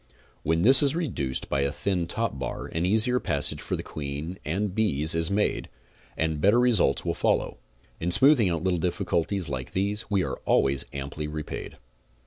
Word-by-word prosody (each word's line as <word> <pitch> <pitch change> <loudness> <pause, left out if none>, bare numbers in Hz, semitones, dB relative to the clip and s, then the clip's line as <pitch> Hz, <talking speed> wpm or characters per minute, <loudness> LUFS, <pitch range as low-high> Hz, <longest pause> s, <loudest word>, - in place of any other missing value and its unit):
When 80 +3 +1
this 130 +7 +7
is 145 0 +2
reduced 85 - -2
by 70 - 0
a 70 0 0
thin 90 +2 -1
top 110 -6 -2
bar 65 - -4
an 85 +2 -2
easier 110 +5 +2
passage - - -1
for - - -2
the - - -5
queen 75 +5 -6
and 95 +5 -2
bees 85 -8 +1
is 80 +1 0
made, 100 +1 0 0.5
and 80 -2 -1
better 105 +7 +5
results 115 - +3
will - - 0
follow. - - 0 0.4
In 85 - -1
smoothing 130 0 +5
out 85 -1 -2
little 90 -2 +1
difficulties 90 +1 -1
like 65 -3 -5
these 100 +3 -2
we 100 -3 +2
are' - - -4
always 70 0 +2
amply 70 +2 -5
repaid. 75 0 -6
90 Hz, 175 wpm, -26 LUFS, 75-105 Hz, 0.5 s, this